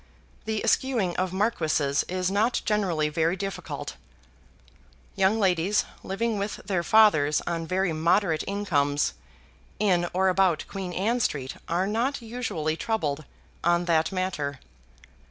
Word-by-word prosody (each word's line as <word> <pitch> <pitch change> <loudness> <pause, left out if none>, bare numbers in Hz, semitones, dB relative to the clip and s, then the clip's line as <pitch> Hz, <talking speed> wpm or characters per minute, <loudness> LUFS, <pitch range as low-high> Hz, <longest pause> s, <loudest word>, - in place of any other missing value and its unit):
The 220 -1 -2
eschewing 230 -10 +1
of 185 0 0
marquises 160 -8 +1
is 185 0 -1
not 220 +5 +1
generally 185 -8 +1
very 160 +3 +1
difficult. 195 0 -5 1.2
Young 195 +2 +3
ladies 190 0 +2 0.2
living 215 +2 -2
with 200 +1 -2
their 185 -4 0
fathers 170 -8 +4
on 165 -1 -2
very 185 -1 0
moderate 165 +1 +2
incomes 145 -8 0 0.6
in 180 -4 +2
or 190 +1 +2
about 185 -3 +2
Queen 190 -2 -5
Anne 220 +7 0
Street 135 - -2
are 175 +3 +1
not 235 +7 0
usually 225 -10 -3
much 160 - -8
troubled 155 -10 -1 0.4
on 175 +1 +2
that 160 0 +2
matter. 175 -8 -2
185 Hz, 130 wpm, -26 LUFS, 160-205 Hz, 1.2 s, fathers